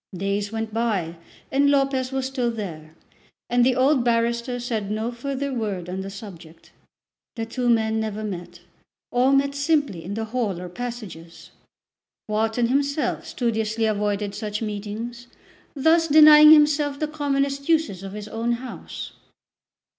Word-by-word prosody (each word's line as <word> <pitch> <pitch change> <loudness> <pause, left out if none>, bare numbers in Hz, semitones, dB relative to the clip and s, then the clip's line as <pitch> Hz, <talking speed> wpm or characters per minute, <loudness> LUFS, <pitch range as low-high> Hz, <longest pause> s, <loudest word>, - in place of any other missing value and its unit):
Days 200 +2 -2
went 225 -1 -4
by 205 -8 -1 0.4
and 280 +1 +3
Lopez 275 -2 +1
was 265 -1 -2
still 260 -2 -1
there, 165 -9 -7 0.6
and 245 0 +4
the 255 0 +3
old 260 0 +3
barrister 235 +1 0
said 225 -4 -3
no 220 +3 -2
further 275 +3 -4
word 205 -7 -3
on 185 +1 -4
the 195 - -6
subject. 180 -5 -12 0.6
The 225 -1 -3
two 245 +2 -2
men 220 -1 +2
never 215 -1 -3
met; 175 -4 -7 0.5
or 250 +2 +3
met 275 0 +2
simply 280 - 0
in 195 +4 -5
the 220 0 -2
hall 220 -6 -2
or 180 0 -7
passages. 195 -7 -8 0.8
Wharton 220 +2 0
himself 280 +1 -1
studiously 225 -2 -1
avoided 205 -1 -1
such 210 0 -4
meetings, 220 +3 -5 0.5
thus 325 +4 +3
denying 305 0 +9
himself 295 -2 +4
the 305 - 0
commonest 280 -1 -1
uses 315 - +1
of 195 0 -8
his 210 0 -7
own 230 +2 -1
house. 250 +2 -7
230 Hz, 145 wpm, -23 LUFS, 205-270 Hz, 0.8 s, denying